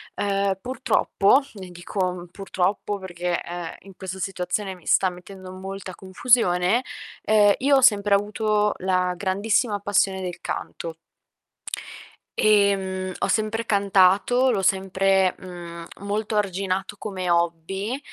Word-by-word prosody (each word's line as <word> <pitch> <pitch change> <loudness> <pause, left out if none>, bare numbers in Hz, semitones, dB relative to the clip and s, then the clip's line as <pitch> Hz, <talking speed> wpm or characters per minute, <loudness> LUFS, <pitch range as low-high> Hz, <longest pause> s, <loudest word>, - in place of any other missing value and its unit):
uhm, 200 -1 0
purtroppo, 255 0 +2
e 190 -3 -9
dico, 180 +1 -2
mhmm, 175 -1 -8
purtroppo 195 +2 -2
perché, 175 -2 -3
ehm, 175 -1 -6
in 195 -1 -15
questa 190 0 -6
situazione 190 +1 -3
mi 180 -3 -16
sta 190 - +4
mettendo 185 +1 -11
molta 190 0 -7
confusione, 190 +1 +2 0.4
ehm, 210 -1 +5
io 280 +2 +4
ho 265 - +4
sempre 205 -5 +5
avuto 210 0 +1
la 185 -1 0
grandissima 205 +4 0
passione 195 -1 +1
del 180 -2 -6
canto. 165 -1 -5 1.4
Ehm, 195 -3 +2
ho - - -1
sempre 220 +1 0
cantato, 200 +5 +3
l'ho 200 - 0
sempre, 190 0 +2
mhmm, 170 -2 -9 0.2
molto 210 +1 -2
arginato 195 0 -1
come 185 -4 -3
hobby, 170 +8 -1
195 Hz, 125 wpm, -24 LUFS, 185-205 Hz, 1.4 s, ehm